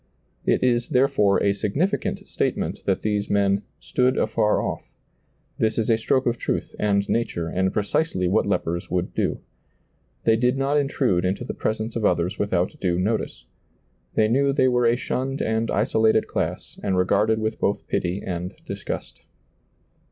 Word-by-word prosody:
It - - +2
is, 120 -2 +2
therefore, 125 -7 +3
a 100 0 +3
significant 145 - -1
statement - - -2
that - - 0
these 105 -1 -1
men 100 0 +2 0.2
"stood 125 0 +1
afar 110 -1 +2
off"; - - -4 0.7
this 110 -1 +1
is 115 0 +1
a 110 - +4
stroke 130 +3 +1
of 120 -1 0
truth - - -2
and 100 -1 +1
nature, 85 -8 -1
and 95 +3 0
precisely 105 - 0
what 90 - +2
lepers 85 +1 -1
would 90 0 -1
do. - - -1 0.8
They 115 - +4
did 125 +3 +2
not 135 +2 +1
intrude 130 -10 +1
into 95 +6 -1
the - - -4
presence 110 +1 -2
of 115 - -2
others 90 0 +1
with 105 - -1
out 90 0 +1
due 90 -2 +1
notice; 105 +5 -2 0.7
they 110 - +4
knew 140 +5 +2
they 135 -2 +3
were 125 -1 +3
a 115 - +4
shunned 135 +2 -2
and 110 +1 0
isolated 110 0 +2
class - - -3
and 95 -1 0
regarded 100 +4 +2
with 110 0 -2
both 100 - -1
pity 90 +3 -1
and 90 0 -4
disgust. - - -6
110 Hz, 165 wpm, -24 LUFS, 100-120 Hz, 0.8 s, a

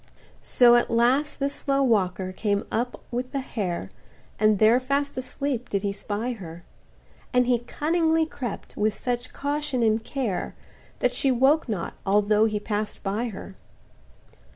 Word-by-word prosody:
So 240 -1 +5
at 240 - +1
last 255 +6 +2
this 280 0 0
slow 275 -1 0
walker 190 -6 +1
came 200 +1 -1
up 240 +3 -2
with 250 +1 -3
the 275 - 0
hare, 180 - -4 0.5
And 215 -1 +4
there 220 +4 +5
fast 280 +2 -1
asleep 255 -1 -3
did 200 -1 -1
he 200 - 0
spy 210 +4 -3
her; 175 -7 -8 0.7
And 250 0 +4
he 245 -1 +2
cunningly 320 +6 +1
crept 255 -8 -6
with 215 0 +1
such 245 0 -3
caution 285 -3 -1
and 220 0 +2
care, 240 -7 -3 0.5
That - - +2
she 275 - +1
woke 265 +3 +3
not, 195 -6 -3
although 210 +2 +3
he 215 -1 0
pass'd 210 0 -3
by 205 +4 -1
her. 200 -3 -7
235 Hz, 155 wpm, -25 LUFS, 210-270 Hz, 0.7 s, So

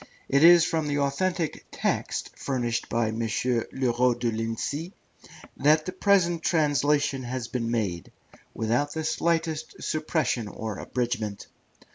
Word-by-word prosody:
It 140 +2 +3
is 170 0 +8
from 160 -2 -1
the 145 0 0
authentic 160 +4 -1
text - - -2
furnished 120 -4 -2
by 115 -1 +1
M. 110 +1 -4 0.5
Le 130 -2 0
Roux 125 0 +3
de 120 -1 -1
Lincy 115 - -3 0.6
that 155 +2 +4
the 185 - -3
present 185 -3 +2
translation 145 -3 +2
has 125 -1 -4
been 120 -2 -2
made, 100 -8 -2 0.4
without 120 +6 0
the 160 - -3
slightest 160 0 -1
suppression 155 -7 -1
or 105 0 -5
abridgment. 110 -5 -3
140 Hz, 130 wpm, -26 LUFS, 115-160 Hz, 0.6 s, is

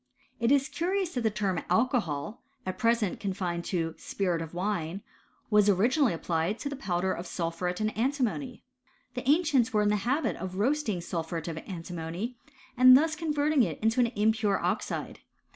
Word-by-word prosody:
It 235 +1 +2
is 280 0 +4
curious 365 +2 -1
that 245 - -1
the 225 - +2
term 200 -4 -1
alcoholy 220 - 0 0.3
at 185 0 -4
present 230 -4 +1
confined 185 -4 -2
to 165 -3 -1
spirit 180 -4 -1
of 165 -1 -6
vnne, 180 -1 -2 0.5
was 210 -1 +5
originally 240 - +3
applied 165 +4 -1
to 285 - -4
the 285 - -4
powder 185 -7 -1
of 175 - -6
sulphuret 180 +1 -3
of 215 - +2
antimony. 255 0 -1 0.5
J 250 - -3
The 255 - -3
ancients 290 -6 +3
were 210 -1 +3
in 205 - +3
the 210 - +2
habit 260 +10 0
of 185 -1 -6
roasting 220 -3 0
sulphuret 165 -1 -4
of 160 -1 -4
antimony, 175 +5 -5 0.4
and 255 +1 +9
thus 315 +2 +1
converting 300 -2 +1
it 170 -10 0
into 225 +3 +1
an 245 - +5
impure 215 -1 +2
oxide. - - -2
210 Hz, 170 wpm, -29 LUFS, 180-255 Hz, 0.5 s, and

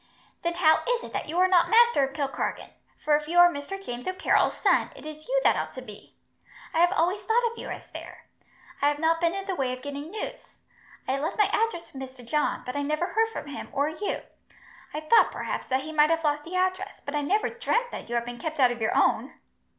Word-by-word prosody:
"Then 340 0 -1
how 320 -3 +4
is - - +1
it - - -9
that - - -3
you 330 - -3
are 370 +1 +5
not 365 -2 +4
master 470 -7 +5
of 270 0 -2
Kilkargan, 280 -3 -3 0.3
for 300 - +5
if 300 0 -2
you 345 +2 -1
are 350 0 +8
Mr. 285 +8 -6
James 245 -10 -7
O'Carroll's 370 +1 +2
son, - - +3
it - - -12
is 310 0 -9
you - - +2
that - - +5
ought - - -3
to - - -7
be? - - -13 0.6
I 325 - +1
have 350 +1 +5
always 375 +2 +1
thought 460 +3 +2
of 465 - -12
you - - -6
as - - -6
there. - - -10 0.6
I 285 - +4
have 290 0 +1
not 325 +2 +1
been 340 +1 +2
in 390 0 -4
the 390 - -2
way 270 -7 -1
of 255 - -8
getting 285 +2 -6
news. 440 +5 -7 0.5
I 265 +1 0
left 315 +5 -3
my 420 - +5
address 430 -7 -1
with 270 - -7
Mr. 260 -2 -9
John, 300 +6 0
but 250 +1 -5
I 285 - 0
never 305 +4 0
heard 450 +1 +2
from 450 - -6
him, 285 0 -7
or 285 +2 +1
you. 360 +6 -3 0.7
I 300 - -4
thought, 315 +9 +5
perhaps, - - -4
that 260 0 +1
he 310 - -6
might 305 0 +4
have 330 0 +1
lost 295 -1 0
the 350 +3 -6
address, 370 +2 -1
but 285 - -4
I 295 - 0
never 400 +9 +1
dreamt 475 +1 -1
that - - -7
you 240 - -2
had 235 0 0
been 240 0 -7
kept 315 +1 -4
out 250 -2 +5
of 240 -1 -6
your 220 - +1
own." - - +2
320 Hz, 250 wpm, -27 LUFS, 285-385 Hz, 0.7 s, are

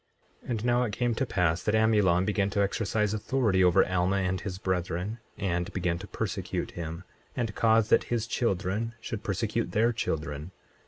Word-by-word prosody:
24:8 - - -12
And 115 -2 -2
now 120 0 +3
it 115 -4 -1
came 120 +2 0
to 130 +4 -1
pass 90 -4 +1
that 105 - +1
Amulon 105 -5 +3
began 100 -1 +1
to 100 - -2
exercise 105 +1 +1
authority 110 -3 +1
over 90 -1 +5
Alma 90 +1 +1
and 95 -1 0
his 95 -4 -5
brethren, 95 +3 -2 0.2
and 85 -4 -1
began 85 -2 -1
to 100 - -8
persecute - - -3
him, 85 +1 -6 0.3
and 115 -4 -2
cause 110 -1 +3
that - - +4
his 115 -2 -1
children 110 0 -1
should 110 -2 -5
persecute 105 +3 -2
their 115 +3 +3
children. 75 -7 -3
100 Hz, 175 wpm, -28 LUFS, 90-115 Hz, 0.3 s, over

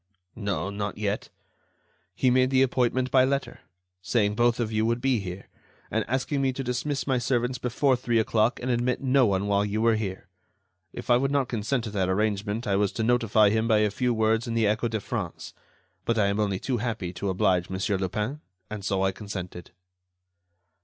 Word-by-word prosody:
No, 100 -3 -2
not 100 0 -4
yet. 105 0 -2 0.9
He 130 - +2
made 130 +1 +3
the 130 0 +4
appointment 130 0 +1
by 130 -1 +5
letter, 135 +1 -1 0.4
saying 105 0 +1
both 120 +2 +2
of 115 -2 -1
you 110 0 +1
would 115 +1 +1
be 130 -2 +1
here, 95 -1 -7 0.4
and - - +1
asking 130 +4 -1
me 135 -1 +2
to 135 - -4
dismiss 130 +3 -2
my 130 -3 +1
servants 125 0 0
before 130 +2 +1
three 120 -1 0
o'clock 110 +1 +2
and 125 +1 -2
admit 120 +1 0
no 130 -2 +4
one 100 0 0
while 100 0 +2
you 105 +1 -2
were 115 0 +4
here. 100 -4 -4 0.6
If - - -4
I 120 - +7
would 135 +2 0
not 140 -3 0
consent 115 +2 -1
to 110 - -5
that 95 -3 0
arrangement, 105 +3 -1
I 100 -1 +1
was 100 -1 +1
to 115 - -2
notify 110 -3 +3
him 110 +1 +1
by 110 -2 +4
a 105 -1 +2
few 125 +3 0
words 110 +1 +1
in 115 - -2
the 115 -1 +2
Echo 110 +3 +1
de 110 -1 -2
France. - - -5 0.5
But 115 - 0
I 100 -2 +3
am 100 +1 -1
only 100 -3 0
too 125 +5 -2
happy 110 -6 -3
to 95 +2 -3
oblige 90 -1 +1
Mon. 95 0 -4 0.2
Lupin, 105 +10 -3 0.3
and 105 -2 -5
so 95 -1 0
I 95 - +2
consented." 95 -3 -7
110 Hz, 200 wpm, -26 LUFS, 100-125 Hz, 0.9 s, I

